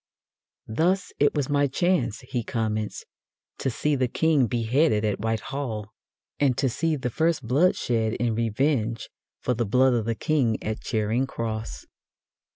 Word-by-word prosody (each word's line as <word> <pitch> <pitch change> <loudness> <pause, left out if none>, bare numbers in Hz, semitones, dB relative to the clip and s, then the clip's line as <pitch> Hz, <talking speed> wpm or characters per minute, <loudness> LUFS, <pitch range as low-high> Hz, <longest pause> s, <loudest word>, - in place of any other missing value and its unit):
"Thus 175 - 0
it 145 - +3
was 145 -3 0
my 145 -1 +2
chance," 170 - 0
he 125 -1 -3
comments, 110 -2 -2 0.5
"to - - 0
see 150 +5 0
the 130 -2 +1
King 150 -1 +2
beheaded 120 0 +2
at 105 -2 -1
White 110 +1 -1
Hall, 110 -7 -4 0.5
and 135 -4 +2
to 135 - +2
see 160 +6 0
the 130 -4 -3
first 160 0 +1
blood 155 +10 +4
shed 110 -2 0
in 120 -1 0
revenge 115 0 0 0.3
for 125 - 0
the 120 0 0
blood 130 +4 +3
of 115 -3 0
the 115 0 -1
King 125 -5 +1
at 110 0 -3
Charing 110 +3 0
Cross. 110 - -4
120 Hz, 160 wpm, -25 LUFS, 110-145 Hz, 0.5 s, blood